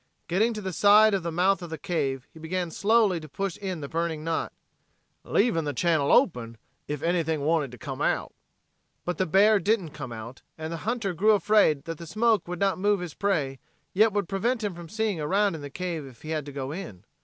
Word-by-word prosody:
Getting 210 Hz, +7 st, +2 dB
to 215 Hz, -, -4 dB
the 190 Hz, -2 st, -4 dB
side 210 Hz, +4 st, +6 dB
of 195 Hz, -, +1 dB
the 170 Hz, 0 st, -3 dB
mouth 185 Hz, +4 st, +2 dB
of 175 Hz, -, -7 dB
the 160 Hz, -, -5 dB
cave 140 Hz, -8 st, -2 dB
he 160 Hz, -, -13 dB
began 175 Hz, +1 st, -3 dB
slowly 210 Hz, -2 st, +3 dB
to 155 Hz, -1 st, -11 dB
push 195 Hz, +5 st, -3 dB
in 185 Hz, -5 st, -4 dB
the 140 Hz, -, -5 dB
burning 165 Hz, 0 st, -2 dB
knot, 165 Hz, 0 st, -2 dB, 0.7 s
"leavin' 205 Hz, -7 st, +2 dB
the 145 Hz, -2 st, -3 dB
channel 160 Hz, -2 st, +2 dB
open 120 Hz, -, +2 dB, 0.3 s
ef 150 Hz, -1 st, -4 dB
anything 165 Hz, -3 st, 0 dB
wanted 150 Hz, -1 st, +1 dB
to 125 Hz, -, -10 dB
come -, -, -6 dB
out." -, -, 0 dB, 0.7 s
But 180 Hz, -2 st, -3 dB
the 185 Hz, -, +1 dB
bear 200 Hz, +5 st, +5 dB
didn't 195 Hz, -4 st, 0 dB
come 135 Hz, -5 st, -7 dB
out, 115 Hz, +3 st, -8 dB, 0.2 s
and 160 Hz, +1 st, -5 dB
the -, -, -3 dB
hunter 230 Hz, -6 st, -1 dB
grew 210 Hz, +6 st, +4 dB
afraid 205 Hz, -7 st, +3 dB
that 165 Hz, -1 st, -6 dB
the 170 Hz, -, -8 dB
smoke 215 Hz, 0 st, +2 dB
would 180 Hz, 0 st, -4 dB
not 195 Hz, -2 st, +1 dB
move 205 Hz, +1 st, +2 dB
his 175 Hz, -4 st, -6 dB
prey 150 Hz, -10 st, -1 dB, 0.3 s
yet 215 Hz, +3 st, +4 dB
would 200 Hz, -3 st, -1 dB
prevent 230 Hz, +5 st, -1 dB
him 175 Hz, -5 st, -5 dB
seeing 220 Hz, -5 st, -1 dB
around 195 Hz, +6 st, +2 dB
in 160 Hz, -, -6 dB
the 145 Hz, -, -7 dB
cave 165 Hz, -2 st, -4 dB
if 125 Hz, -4 st, -15 dB
he 155 Hz, -, -6 dB
had 155 Hz, -2 st, -2 dB
to -, -, -6 dB
go 135 Hz, -1 st, -4 dB
in. 160 Hz, -, -8 dB
170 Hz, 220 wpm, -26 LUFS, 155-200 Hz, 0.7 s, side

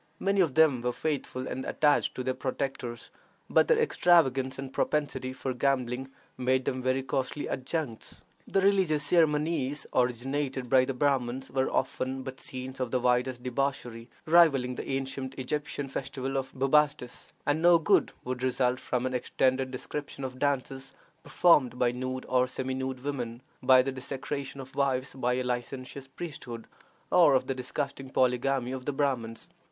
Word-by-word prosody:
Many 195 Hz, 0 st, +2 dB
of 160 Hz, -7 st, +1 dB
them 155 Hz, -6 st, +5 dB
were 125 Hz, 0 st, -1 dB
faithful 140 Hz, -4 st, -3 dB
and 130 Hz, -, -4 dB
attached 150 Hz, -1 st, +2 dB
to 130 Hz, -, -3 dB
their 130 Hz, 0 st, 0 dB
protectors, 130 Hz, -3 st, -4 dB, 0.4 s
but -, -, +4 dB
their 475 Hz, -, +4 dB
extravagance 150 Hz, -, +3 dB
and 135 Hz, -1 st, -7 dB
propensity 135 Hz, -4 st, -1 dB
for 130 Hz, 0 st, -4 dB
gambling 130 Hz, -1 st, 0 dB, 0.3 s
made 130 Hz, 0 st, +1 dB
them 130 Hz, 0 st, -1 dB
very 130 Hz, +1 st, 0 dB
costly 135 Hz, +2 st, -2 dB
adjuncts. 130 Hz, -3 st, -4 dB, 0.2 s
The 195 Hz, -, +1 dB
religious 190 Hz, -7 st, +3 dB
ceremonies 150 Hz, -3 st, +1 dB
originated 130 Hz, +1 st, -1 dB
by 130 Hz, -1 st, +6 dB
the 135 Hz, 0 st, -3 dB
Brahmins 135 Hz, -1 st, 0 dB
were 130 Hz, 0 st, +1 dB
often 130 Hz, +1 st, -1 dB
but 130 Hz, -1 st, -7 dB
scenes 130 Hz, +1 st, -5 dB
of 130 Hz, -2 st, -1 dB
the 130 Hz, -, +1 dB
wildest 125 Hz, 0 st, +1 dB
debauchery, 125 Hz, -2 st, -3 dB, 0.2 s
rivaling 155 Hz, -7 st, +5 dB
the -, -, -6 dB
ancient 135 Hz, 0 st, -3 dB
Egyptian 145 Hz, +1 st, -3 dB
festival 135 Hz, 0 st, -4 dB
of 135 Hz, 0 st, -2 dB
Bubastis, 135 Hz, -1 st, +1 dB
and 145 Hz, +2 st, +1 dB
no 175 Hz, 0 st, +7 dB
good 165 Hz, -, +3 dB
would 125 Hz, 0 st, -4 dB
result 130 Hz, 0 st, +1 dB
from 125 Hz, 0 st, -2 dB
an 130 Hz, -, -2 dB
extended 130 Hz, +1 st, +1 dB
description 140 Hz, +2 st, -6 dB
of 130 Hz, -1 st, -5 dB
dances 135 Hz, -1 st, -2 dB, 0.3 s
performed 145 Hz, -10 st, +3 dB
by 125 Hz, -1 st, +2 dB
nude 130 Hz, +1 st, -4 dB
or 125 Hz, 0 st, +2 dB
semi 130 Hz, 0 st, -3 dB
nude 130 Hz, -1 st, -4 dB
women, 125 Hz, -4 st, -4 dB, 0.2 s
of 130 Hz, -1 st, +6 dB
the 135 Hz, -, -1 dB
desecration 135 Hz, +1 st, -5 dB
of 130 Hz, 0 st, -9 dB
wives 135 Hz, -2 st, 0 dB
by 125 Hz, -2 st, 0 dB
a 130 Hz, -, -1 dB
licentious 125 Hz, +2 st, -4 dB
priesthood, 130 Hz, -6 st, -7 dB, 0.5 s
or 165 Hz, -6 st, +6 dB
of 130 Hz, -, +2 dB
the 135 Hz, -, -1 dB
disgusting 135 Hz, +1 st, -4 dB
polygamy 130 Hz, 0 st, +1 dB
of 130 Hz, -1 st, -5 dB
the 145 Hz, -, -1 dB
Brahmins. 135 Hz, +1 st, -2 dB
130 Hz, 160 wpm, -29 LUFS, 125-140 Hz, 0.5 s, no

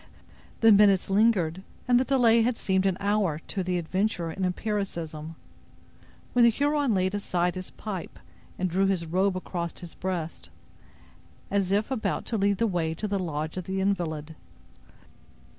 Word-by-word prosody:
The 225 Hz, -1 st, +7 dB
minutes 200 Hz, -2 st, +5 dB
lingered, 195 Hz, -5 st, +2 dB, 0.3 s
and 245 Hz, -1 st, +5 dB
the -, -, +3 dB
delay 240 Hz, -4 st, +4 dB
had 235 Hz, +1 st, +1 dB
seemed 190 Hz, 0 st, +1 dB
an 185 Hz, -1 st, 0 dB
hour 200 Hz, -6 st, +1 dB
to 195 Hz, -, -2 dB
the 180 Hz, 0 st, -1 dB
adventurer 175 Hz, 0 st, -1 dB
in 190 Hz, +4 st, -4 dB
empiricism, 170 Hz, -5 st, -3 dB, 1.0 s
when 245 Hz, -, +5 dB
the 235 Hz, -, +8 dB
Huron 285 Hz, 0 st, +1 dB
laid 185 Hz, +1 st, +1 dB
aside 180 Hz, -3 st, 0 dB
his 185 Hz, 0 st, -7 dB
pipe 195 Hz, -5 st, -7 dB, 0.4 s
and 185 Hz, -, 0 dB
drew 190 Hz, +3 st, +1 dB
his 185 Hz, -3 st, 0 dB
robe 185 Hz, +3 st, +1 dB
across 170 Hz, -2 st, -4 dB
his 175 Hz, -2 st, -9 dB
breast, 175 Hz, -3 st, -4 dB, 1.0 s
as 195 Hz, -2 st, +1 dB
if 210 Hz, +6 st, +1 dB
about 245 Hz, -4 st, -1 dB
to 225 Hz, -, -2 dB
lead 200 Hz, 0 st, +2 dB
the 230 Hz, -, +2 dB
way 170 Hz, -6 st, -1 dB
to 210 Hz, -, -3 dB
the 200 Hz, -1 st, -1 dB
lodge 155 Hz, -2 st, -3 dB
of 185 Hz, -, -4 dB
the 190 Hz, 0 st, -2 dB
invalid. 165 Hz, -5 st, -2 dB
190 Hz, 160 wpm, -27 LUFS, 175-210 Hz, 1.0 s, the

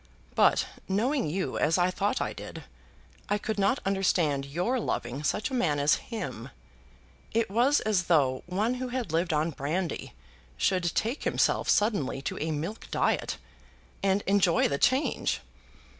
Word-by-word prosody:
But, -, -, +4 dB, 0.2 s
knowing 235 Hz, -, +1 dB
you 185 Hz, +4 st, -2 dB
as 155 Hz, +2 st, +3 dB
I 180 Hz, 0 st, +3 dB
thought 200 Hz, +5 st, 0 dB
I -, -, -2 dB
did, -, -, -8 dB, 0.7 s
I 205 Hz, -, +2 dB
could 215 Hz, 0 st, -3 dB
not 200 Hz, +6 st, +3 dB
understand 175 Hz, -8 st, +1 dB
your 180 Hz, -, 0 dB
loving 130 Hz, -, -3 dB
such 210 Hz, -, 0 dB
a -, -, -5 dB
man 165 Hz, -, +1 dB
as 145 Hz, +1 st, +3 dB
him. 180 Hz, -, -5 dB, 0.8 s
It 225 Hz, -3 st, +1 dB
was 250 Hz, +7 st, +3 dB
as 205 Hz, -5 st, +1 dB
though 135 Hz, -7 st, +3 dB
one 205 Hz, +7 st, 0 dB
who 255 Hz, 0 st, -3 dB
had 245 Hz, -8 st, -3 dB
lived 170 Hz, +2 st, +1 dB
on 155 Hz, +2 st, +1 dB
brandy 160 Hz, +5 st, -3 dB, 0.4 s
should 175 Hz, -, +1 dB
take 235 Hz, +7 st, -1 dB
himself -, -, +1 dB
suddenly 205 Hz, -, +2 dB
to -, -, -3 dB
a 155 Hz, -, -2 dB
milk 160 Hz, +8 st, -4 dB
diet, -, -, 0 dB, 0.6 s
and 195 Hz, +1 st, +2 dB
enjoy 190 Hz, -3 st, +3 dB
the 140 Hz, -, -2 dB
change! 260 Hz, +4 st, +1 dB
190 Hz, 155 wpm, -28 LUFS, 155-220 Hz, 0.8 s, But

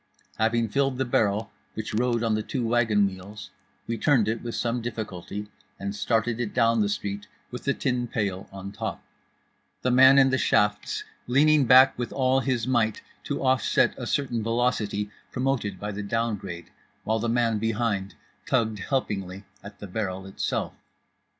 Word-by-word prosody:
Having 115 Hz, 0 st, +2 dB
filled 135 Hz, +2 st, +1 dB
the 130 Hz, -, 0 dB
barrel 105 Hz, -2 st, +1 dB, 0.2 s
which 110 Hz, -1 st, -5 dB
rode 120 Hz, +1 st, +1 dB
on 115 Hz, -1 st, +1 dB
the 110 Hz, -, 0 dB
two 125 Hz, +2 st, -3 dB
wagon 115 Hz, -3 st, +3 dB
wheels, 100 Hz, +2 st, -7 dB, 0.3 s
we 115 Hz, -1 st, -3 dB
turned 130 Hz, -7 st, +3 dB
it 110 Hz, +1 st, -1 dB
with 120 Hz, -1 st, -5 dB
some 120 Hz, 0 st, -1 dB
difficulty 105 Hz, -3 st, -5 dB, 0.3 s
and 100 Hz, +1 st, -4 dB
started 115 Hz, +2 st, 0 dB
it 120 Hz, -4 st, -3 dB
down 115 Hz, -2 st, +3 dB
the 100 Hz, -, +1 dB
street 100 Hz, 0 st, -4 dB, 0.2 s
with 125 Hz, -, -7 dB
the 140 Hz, -, +2 dB
tin 125 Hz, -3 st, -1 dB
pail 100 Hz, -5 st, -3 dB
on 100 Hz, 0 st, -7 dB
top; -, -, -5 dB, 0.8 s
the 125 Hz, -, +2 dB
man 130 Hz, +2 st, +7 dB
in 135 Hz, -1 st, +6 dB
the 130 Hz, -, +1 dB
shafts 105 Hz, 0 st, +1 dB, 0.2 s
leaning 145 Hz, +3 st, +4 dB
back 130 Hz, +2 st, +7 dB
with 120 Hz, -2 st, -3 dB
all 130 Hz, 0 st, +2 dB
his 130 Hz, -4 st, -1 dB
might 120 Hz, -4 st, +1 dB, 0.2 s
to -, -, -3 dB
offset 130 Hz, -2 st, +3 dB
a -, -, -6 dB
certain 125 Hz, -5 st, -1 dB
velocity 110 Hz, -3 st, 0 dB, 0.2 s
promoted 125 Hz, -7 st, -1 dB
by 105 Hz, +1 st, -4 dB
the 100 Hz, +1 st, -5 dB
down 115 Hz, +2 st, -1 dB
grade, 90 Hz, -4 st, -8 dB, 0.3 s
while 110 Hz, +1 st, 0 dB
the 115 Hz, +1 st, -1 dB
man 115 Hz, -2 st, +1 dB
behind 110 Hz, -3 st, -1 dB, 0.3 s
tugged 110 Hz, -4 st, +1 dB
helpingly 100 Hz, -6 st, -2 dB, 0.2 s
at 105 Hz, -, -10 dB
the -, -, -8 dB
barrel 95 Hz, -1 st, -3 dB
itself. 95 Hz, -, -3 dB
115 Hz, 170 wpm, -26 LUFS, 105-125 Hz, 0.8 s, man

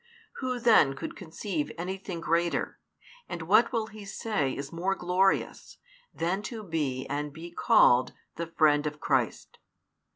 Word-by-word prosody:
Who 255 Hz, -2 st, -2 dB
then 220 Hz, -, +5 dB
could -, -, -6 dB
conceive 170 Hz, -2 st, -4 dB
any 180 Hz, +3 st, -3 dB
thing 180 Hz, -3 st, -6 dB
greater, 170 Hz, +1 st, 0 dB, 0.5 s
and 170 Hz, -, -5 dB
what 215 Hz, +8 st, +4 dB
will 230 Hz, -3 st, 0 dB
he 215 Hz, -1 st, -11 dB
say 195 Hz, -8 st, -2 dB
is 140 Hz, +3 st, -6 dB
more 185 Hz, +3 st, 0 dB
glorious, 185 Hz, +2 st, 0 dB, 0.3 s
than 175 Hz, +4 st, -1 dB
to 225 Hz, -4 st, -7 dB
be 150 Hz, -8 st, -2 dB
and 145 Hz, +1 st, -3 dB
be 165 Hz, +4 st, -9 dB
called 125 Hz, -6 st, +4 dB, 0.2 s
the 170 Hz, 0 st, -4 dB
friend 150 Hz, -2 st, +3 dB
of 150 Hz, 0 st, -5 dB
Christ? 130 Hz, -7 st, -1 dB
170 Hz, 150 wpm, -28 LUFS, 150-195 Hz, 0.5 s, then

